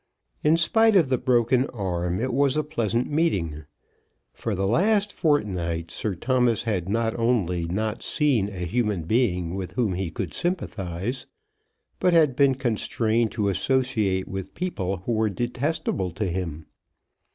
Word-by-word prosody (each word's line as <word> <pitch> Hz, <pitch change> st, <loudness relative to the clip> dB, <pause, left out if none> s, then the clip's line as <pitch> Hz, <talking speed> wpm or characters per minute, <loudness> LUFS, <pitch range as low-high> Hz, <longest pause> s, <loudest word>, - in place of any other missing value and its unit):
In 155 Hz, +2 st, +4 dB
spite 220 Hz, +6 st, +4 dB
of 165 Hz, -8 st, +4 dB
the 130 Hz, -2 st, +1 dB
broken 125 Hz, +1 st, +2 dB
arm 90 Hz, -4 st, -2 dB
it 130 Hz, +2 st, -1 dB
was 140 Hz, +1 st, +2 dB
a 155 Hz, -, +1 dB
pleasant 120 Hz, -6 st, -1 dB
meeting. 85 Hz, -, 0 dB, 0.7 s
For 110 Hz, -, -3 dB
the 95 Hz, +1 st, -1 dB
last 205 Hz, -, +2 dB
fortnight 90 Hz, -, 0 dB
Sir 105 Hz, -4 st, -3 dB
Thomas 125 Hz, +2 st, +1 dB
had 95 Hz, -5 st, -2 dB
not 115 Hz, +1 st, 0 dB
only 95 Hz, -8 st, +1 dB
not 105 Hz, +6 st, -2 dB
seen 130 Hz, -10 st, +1 dB
a 90 Hz, -3 st, -5 dB
human 105 Hz, -2 st, 0 dB
being 90 Hz, -4 st, +1 dB
with 95 Hz, -2 st, -5 dB
whom 115 Hz, -7 st, 0 dB
he 90 Hz, -1 st, -2 dB
could 80 Hz, -, -5 dB
sympathise, 115 Hz, -, -3 dB, 0.7 s
but 180 Hz, -, +3 dB
had 155 Hz, -6 st, +4 dB
been 140 Hz, -1 st, +4 dB
constrained 115 Hz, -2 st, 0 dB
to 105 Hz, -3 st, 0 dB
associate 110 Hz, -4 st, 0 dB
with 95 Hz, 0 st, -6 dB
people 95 Hz, -, -3 dB
who -, -, -1 dB
were 110 Hz, -1 st, +2 dB
detestable 120 Hz, -, -2 dB
to 105 Hz, +4 st, -2 dB
him. 85 Hz, -4 st, -4 dB
110 Hz, 150 wpm, -25 LUFS, 95-130 Hz, 0.7 s, In